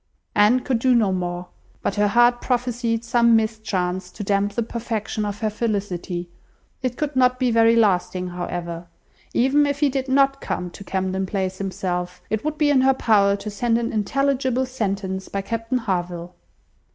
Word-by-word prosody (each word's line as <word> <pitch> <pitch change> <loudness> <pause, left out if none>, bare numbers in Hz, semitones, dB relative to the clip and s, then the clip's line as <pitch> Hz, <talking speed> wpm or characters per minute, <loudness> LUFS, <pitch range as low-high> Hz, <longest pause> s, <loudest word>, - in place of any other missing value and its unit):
Anne 215 +5 +4
could 245 -2 0
do 255 +1 +3
no 215 -5 +3
more; 180 -1 -3 0.3
but - - 0
her 205 +1 +2
heart 240 +3 +4
prophesied 240 -2 -1
some 235 -1 +4
mischance 195 -5 -1
to 205 - -7
damp 200 0 +1
the 235 - 0
perfection 220 -2 -3
of 205 +1 -5
her 215 - +1
felicity. 195 -5 -3 0.5
It 255 -1 -2
could 295 -2 -2
not 255 -1 +4
be 250 -1 +1
very 230 0 +5
lasting, 185 -4 +1
however. 175 -1 -5 0.5
Even 280 +4 +4
if 285 0 -2
he 290 -1 +3
did 265 0 -2
not 275 +1 +3
come 180 -1 -3
to 200 - -10
Camden 190 0 -2
Place 190 -1 -2
himself, 180 -2 -3
it 220 -1 -1
would 305 0 -2
be 300 -2 +3
in 265 -2 +4
her 265 0 +4
power 200 -5 +3
to 200 +1 -6
send 230 +2 +1
an 235 0 -2
intelligible 260 +3 +1
sentence 195 -6 -3
by 200 - -2
Captain 230 +4 -2
Harville. 180 -5 -3
220 Hz, 175 wpm, -22 LUFS, 190-250 Hz, 0.5 s, very